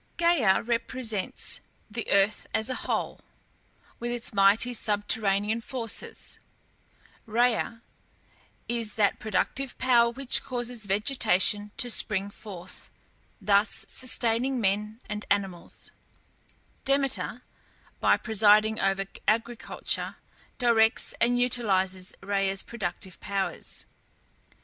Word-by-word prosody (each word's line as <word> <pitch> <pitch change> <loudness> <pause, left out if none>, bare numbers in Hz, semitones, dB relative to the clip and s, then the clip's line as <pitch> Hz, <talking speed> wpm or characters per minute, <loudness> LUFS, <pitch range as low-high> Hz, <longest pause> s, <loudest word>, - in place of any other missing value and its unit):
Gæa 300 - +3
represents 230 -3 -1 0.3
the 225 +1 -5
earth 200 +1 +2
as 220 +4 0
a 255 - -5
whole, - - -1 0.8
with 240 - -3
its 240 0 -3
mighty 200 +5 +4
subterranean 210 0 0
forces; 230 -2 -2 0.9
Rhea 230 0 0 0.8
is 230 -3 -1
that 205 -2 +2
productive 220 +6 -2
power 240 -2 +4
which 265 +2 +2
causes 240 -4 -2
vegetation 205 -1 +2
to 245 - +5
spring 200 -2 +2
forth, 190 -4 -9 0.5
thus 205 0 +2
sustaining 250 +1 +1
men 210 +2 -1
and 210 0 -5
animals; 195 -4 -3 0.9
Demeter, 275 -3 -1 0.6
by - - +4
presiding 215 0 +4
over 195 0 +1 0.2
agriculture, 230 +2 0 0.4
directs 230 -2 +2
and 245 +1 +3
utilizes 190 -7 +1
Rhea's 195 -1 0
productive 190 -4 -5
powers. 200 -1 -3
220 Hz, 95 wpm, -27 LUFS, 200-240 Hz, 0.9 s, to